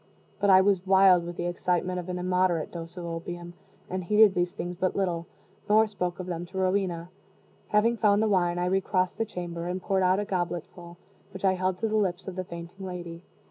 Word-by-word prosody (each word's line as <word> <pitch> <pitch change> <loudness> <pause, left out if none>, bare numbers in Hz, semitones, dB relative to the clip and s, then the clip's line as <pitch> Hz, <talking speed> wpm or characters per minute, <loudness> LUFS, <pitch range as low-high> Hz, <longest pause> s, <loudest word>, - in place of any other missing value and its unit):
But 200 0 +2
I 190 -1 +8
was 190 -2 +2
wild 190 -2 +5
with 175 - -6
the 175 - -2
excitement 180 +1 -1
of 180 +1 -7
an 180 - -3
immoderate 180 -2 +1
dose 170 +1 -8
of 175 - -5
opium, 170 +1 -6 0.3
and 185 0 -3
heeded 210 +2 +5
these 175 -1 0
things 180 0 -5
but 185 +1 -1
little, 175 -4 -1 0.4
nor 215 +1 +6
spoke 180 -4 -4
of 185 - -4
them 175 -2 -4
to 190 - -9
Rowena. 185 -2 0 0.6
Having 230 +3 +2
found 210 -1 +3
the - - +2
wine, 175 -4 +2
I 175 - 0
recrossed 185 +1 0
the 225 - +1
chamber, 175 -4 -5
and 180 +1 -2
poured 190 +1 0
out 185 +1 +3
a 205 - -2
gobletful, 175 -1 -4 0.4
which 190 - -3
I 190 - +4
held 185 0 -1
to 225 - +1
the 215 0 0
lips 190 -3 -1
of 190 - -5
the 185 - -3
fainting 170 +2 -9
lady. 175 -2 -6
180 Hz, 215 wpm, -27 LUFS, 175-195 Hz, 0.6 s, I